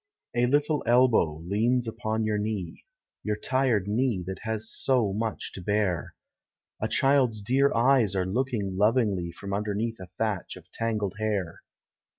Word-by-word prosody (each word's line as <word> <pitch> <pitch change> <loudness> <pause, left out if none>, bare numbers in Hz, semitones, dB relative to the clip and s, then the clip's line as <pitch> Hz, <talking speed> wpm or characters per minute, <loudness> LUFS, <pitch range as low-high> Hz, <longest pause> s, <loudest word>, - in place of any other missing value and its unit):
A 120 0 +2
little 145 +2 +2
elbow 115 -11 +3
leans 115 +6 +1
upon 110 0 -2
your 105 -1 0
knee, 105 -4 -4 0.4
Your 105 0 -1
tired 120 -3 +1
knee 110 -3 0
that 95 +1 -5
has 110 0 -2
so 120 -5 +1
much 110 +1 -3
to 95 - -7
bear; 100 -3 -1 0.7
A 110 - +1
child's 130 -1 +3
dear 130 +7 +2
eyes 120 -4 +3
are 95 -1 +1
looking 105 -2 -2
lovingly 105 -5 +2
From 100 +3 -7
underneath 105 +2 -2
a 95 - -9
thatch 105 0 -3
of 90 -1 -15
tangled 105 -4 -2
hair. 100 -6 -2
110 Hz, 150 wpm, -27 LUFS, 100-120 Hz, 0.7 s, elbow